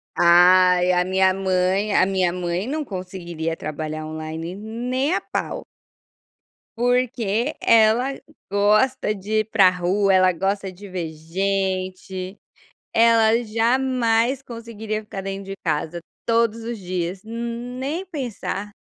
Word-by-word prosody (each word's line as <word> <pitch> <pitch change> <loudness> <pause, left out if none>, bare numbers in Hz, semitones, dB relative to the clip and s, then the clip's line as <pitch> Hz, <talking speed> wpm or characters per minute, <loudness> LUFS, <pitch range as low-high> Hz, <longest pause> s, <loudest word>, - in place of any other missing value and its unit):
Ai, 180 +1 +6
a 180 0 +3
minha 190 0 +3
mãe 190 +2 0
a - - +5
minha 185 -2 +1
mãe 180 +3 -2
não 305 +2 -2
conseguiria 180 - -5
trabalhar 155 0 -5
online 160 +2 -6
nem 245 - -2
a - - 0
pau. - - -4 1.1
Porque 245 0 0
ela 230 +4 +4 0.4
gosta 215 +4 +2
de 210 +2 -1
ir 215 - -6
para 195 -4 +6
rua, 185 +2 +1
ela 185 0 +5
gosta 195 +2 -2
de 195 +3 -12
ver 175 -3 -4
gente, 185 +2 -3 0.6
ela 230 0 +4
jamais 235 +2 +1
conseguiria 225 -3 -6
ficar 210 -2 -7
dentro 195 0 -5
de 195 - -6
casa 160 +1 -1 0.2
todos 230 -1 +1
os 235 0 -4
dias, 180 -1 -3
nem 245 +8 -4
pensar. 235 - -5
200 Hz, 120 wpm, -22 LUFS, 185-230 Hz, 1.1 s, Ai